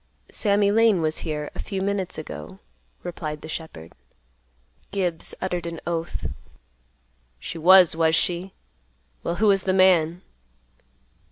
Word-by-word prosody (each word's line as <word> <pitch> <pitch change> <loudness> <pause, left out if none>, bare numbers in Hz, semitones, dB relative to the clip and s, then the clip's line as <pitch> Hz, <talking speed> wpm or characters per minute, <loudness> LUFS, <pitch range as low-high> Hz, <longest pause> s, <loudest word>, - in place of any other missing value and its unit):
"Sammy 200 -1 +2
Lane 220 -3 +4
was 155 0 -1
here 150 -2 -4
a - - -10
few 195 -2 -4
minutes 195 -1 -2
ago," 85 - -8 0.5
replied 155 -3 -5
the - - -9
shepherd. 155 - -8 1.0
Gibbs 180 -4 -1
uttered 180 -2 -3
an 165 -1 -6
oath, 170 0 -3 1.1
"She 165 - -7
was, 180 0 +7
was 160 0 +3
she? 180 +3 -1 0.7
Well, 170 - -2
who 215 +3 +3
was 195 -1 +2
th' 190 -1 +1
man?" 180 -2 +4
175 Hz, 125 wpm, -24 LUFS, 160-190 Hz, 1.1 s, was